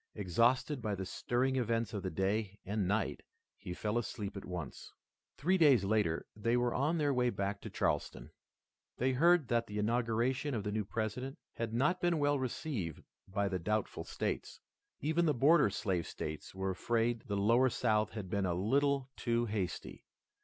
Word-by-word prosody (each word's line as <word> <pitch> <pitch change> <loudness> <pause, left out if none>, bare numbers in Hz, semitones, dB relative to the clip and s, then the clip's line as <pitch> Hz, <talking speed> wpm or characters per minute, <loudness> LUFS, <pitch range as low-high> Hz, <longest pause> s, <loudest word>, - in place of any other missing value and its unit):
Exhausted 120 - +2
by 105 -3 -1
the 95 0 -4
stirring 130 +6 0
events 115 -2 0
of 100 - -2
the 95 - -2
day 100 +3 -1
and 100 -1 -1
night 105 +3 0 0.3
he - - -8
fell 105 +5 -1
asleep 105 -3 -5
at 100 - -6
once. 90 -6 -6 0.5
Three 185 +4 +2
days 140 - +6
later 100 -5 +1
they 115 +3 +1
were 120 -1 +1
on 150 +6 +1
their 145 -3 +2
way 125 -1 +2
back 100 -2 -2
to - - -6
Charleston. - - -2 0.7
They 130 +2 +2
heard 165 +2 +4
that 115 -1 +1
the 105 - -5
inauguration 120 +5 0
of 105 - -2
the 105 - -2
new 105 -1 -1
President 115 +6 -3 0.2
had 115 -1 -3
not 150 +10 +1
been 175 -1 +2
well 145 -1 +2
received 125 - -3 0.2
by 100 +1 0
the 95 -2 -1
doubtful 105 +4 -1
states. - - -3 0.4
Even 160 +4 +2
the 150 - +2
border 145 0 +5
slave 95 -4 -1
states 75 +3 -6
were 95 0 -1
afraid 115 +3 0
the 100 - -1
lower 115 +6 +4
South 110 -2 +1
had 105 -4 -5
been 95 +1 0
a 85 - 0
little 135 +7 +1
too 120 0 0
hasty. 100 -5 -4
115 Hz, 175 wpm, -34 LUFS, 100-130 Hz, 0.7 s, days